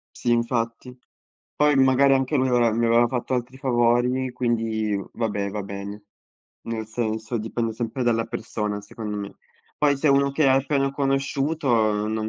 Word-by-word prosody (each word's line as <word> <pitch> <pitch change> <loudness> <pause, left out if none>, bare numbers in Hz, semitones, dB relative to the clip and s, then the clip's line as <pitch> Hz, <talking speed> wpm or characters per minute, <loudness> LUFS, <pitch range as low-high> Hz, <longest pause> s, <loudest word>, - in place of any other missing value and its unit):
Sì 120 - -1
infatti. 115 +1 -1 0.6
Poi 150 -1 +4
magari 135 +1 +5
anche 135 +3 +1
lui 130 0 +2
mi 125 - +2
aveva 120 -2 +3
mi 115 +1 +1
aveva 120 +1 +4
fatto 130 +1 -2
altri 125 +1 -3
favori 125 0 +1
quindi 115 -4 -1 0.2
vabbè, 105 -3 -2
va 105 0 -4
bene. 100 +1 -7 0.6
Nel 110 -1 -4
senso 110 0 -3
dipende 115 +1 -2
sempre 120 +3 -3
dalla 115 -1 +1
persona 110 -3 -4
secondo 105 0 -6
me. 100 -1 -6 0.4
Poi 145 -2 +3
se 150 - -1
è - - +6
uno 140 0 +3
che 140 0 +2
hai 130 - +5
appena 135 -1 0
conosciuto 140 +2 -1
uhm 110 -2 +2
non 110 0 -2
120 Hz, 170 wpm, -24 LUFS, 110-130 Hz, 0.6 s, è